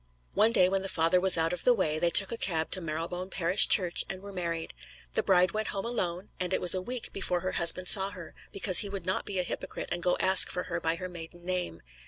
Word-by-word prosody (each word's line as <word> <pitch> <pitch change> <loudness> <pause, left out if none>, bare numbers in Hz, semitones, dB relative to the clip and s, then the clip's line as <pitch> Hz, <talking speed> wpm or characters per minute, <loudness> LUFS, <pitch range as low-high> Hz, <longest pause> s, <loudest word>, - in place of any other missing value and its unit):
One 220 +2 +3
day 185 -5 +4
when 195 +1 -1
the 195 - -5
father 165 +2 +1
was 185 -1 +4
out 165 +1 0
of 180 - -4
the 245 - +4
way 155 -7 -1
they 170 - +2
took 195 +3 +3
a - - -2
cab 165 -8 -2
to 185 - +3
Marylebone 170 +3 -5
Parish 180 +1 +4
Church 180 -4 +3
and 190 - -6
were 200 +1 -11
married. 170 -3 -4 0.4
The - - +1
bride 185 -1 +3
went 215 0 -3
home 195 +1 -3
alone, 185 -5 -3
and 180 0 -1
it - - -1
was 180 - +3
a 185 - -2
week 245 +4 -4
before 180 -2 -2
her 185 +1 -3
husband 175 +2 +1
saw 195 0 +4
her; 185 -5 -11 0.2
because 195 -2 +4
he 205 - -3
would 195 -3 -6
not 185 - -2
be 200 - -5
a 180 - 0
hypocrite - - -6
and 175 - -3
go 180 +1 +1
ask 190 0 +5
for 180 - -4
her 175 -1 -4
by 165 0 -1
her 185 +2 -6
maiden 175 0 -11
name. 180 - -4
180 Hz, 260 wpm, -28 LUFS, 170-195 Hz, 0.4 s, ask